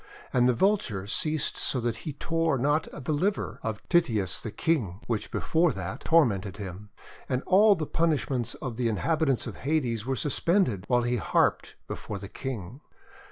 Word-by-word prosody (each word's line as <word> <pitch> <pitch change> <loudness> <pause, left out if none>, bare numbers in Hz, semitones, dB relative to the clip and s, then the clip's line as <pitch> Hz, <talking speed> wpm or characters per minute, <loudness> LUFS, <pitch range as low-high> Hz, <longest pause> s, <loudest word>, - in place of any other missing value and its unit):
And 125 0 +4
the 125 - +2
Vulture 155 - +1
ceased 155 +8 0
so 130 - +1
that 120 -1 -1
he 155 - -6
tore 165 0 0
not 145 +5 +1
the 150 +1 -3
liver 195 +8 -1
of 110 -3 -5
Tityus 110 - +2
the - - -4
King, 110 - -1
which 110 -3 -2
before 165 0 +2
that 95 -2 -5
tormented 100 - +3
him. 100 0 -7 0.4
And 130 0 0
all 205 +2 +6
the 160 -3 -3
punishments 145 -7 0
of 125 -5 -6
the 125 -2 +1
inhabitants 140 - +1
of - - -7
Hades 130 -7 0
were 135 +3 -1
suspended 140 - +1
while 120 -1 +3
he 120 +1 0
harped 100 - +1
before 100 - -5
the 100 0 -8
King. 125 -1 -6
125 Hz, 165 wpm, -28 LUFS, 105-160 Hz, 0.4 s, all